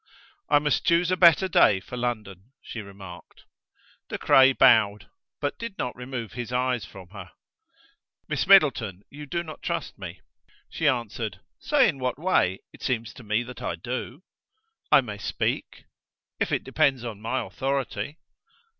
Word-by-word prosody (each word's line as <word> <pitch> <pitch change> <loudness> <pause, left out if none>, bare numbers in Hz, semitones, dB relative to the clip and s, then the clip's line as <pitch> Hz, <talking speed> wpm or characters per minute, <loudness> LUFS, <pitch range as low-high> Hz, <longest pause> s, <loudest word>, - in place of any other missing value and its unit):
"I 145 - +6
must 145 -1 +1
choose 170 +1 +3
a - - +3
better 175 +1 +6
day 105 - +4
for 125 - -9
London," 110 -3 -4
she 115 - -7
remarked. 95 -3 -12 0.7
De - - -3
Craye 135 0 +6
bowed, 110 -6 +4 0.3
but - - -3
did 230 -4 -6
not 125 - -3
remove 125 -3 -6
his 120 0 -5
eyes 125 -2 0
from 95 -2 -13
her. 95 -2 -10 1.0
"Miss - - -1
Middleton, 125 - +4
you 145 +1 -9
do 170 +4 -2
not 155 -2 -10
trust - - -4
me." - - -8 0.5
She 160 - -1
answered: 115 -6 -2 0.2
"Say 285 -4 +3
in 145 -9 -2
what 125 -1 -2
way. 140 - +1
It - - -16
seems 115 -3 -2
to 125 - -13
me 110 +2 0
that 125 +1 -10
I - - -2
do." 130 +5 -6 0.7
"I - - +8
may 105 -5 -7
speak?" - - -3 0.6
"If - - 0
it - - 0
depends 135 -3 +1
on 110 -3 -6
my 120 +4 -1
authority." 140 +2 -3
125 Hz, 160 wpm, -26 LUFS, 105-145 Hz, 1.0 s, I